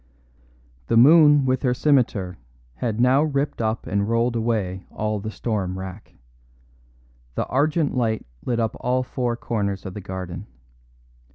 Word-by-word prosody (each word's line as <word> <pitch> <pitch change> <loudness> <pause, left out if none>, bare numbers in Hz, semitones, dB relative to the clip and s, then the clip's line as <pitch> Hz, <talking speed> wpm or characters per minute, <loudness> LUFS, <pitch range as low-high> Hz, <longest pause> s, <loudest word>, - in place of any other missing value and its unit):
The 115 - +2
moon 145 +2 +7
with 130 0 +1
her 125 -3 +1
scimitar 115 - +1 0.4
had 110 - -2
now 130 +3 +4
ripped 145 -4 -1
up 110 0 -1
and 100 +2 -1
rolled 115 +1 +1
away 105 -5 -1
all 105 0 -2
the 110 +2 -5
storm 100 -5 -3
wrack. 95 +2 -9 1.2
The - - -1
argent 150 +2 +1
light 115 -3 0 0.2
lit 120 -2 -1
up 115 -1 -1
all 125 +1 0
four 125 -2 -2
corners 100 -5 -2
of 95 - -6
the 105 - -7
garden. 95 0 -6
115 Hz, 145 wpm, -23 LUFS, 100-130 Hz, 1.2 s, moon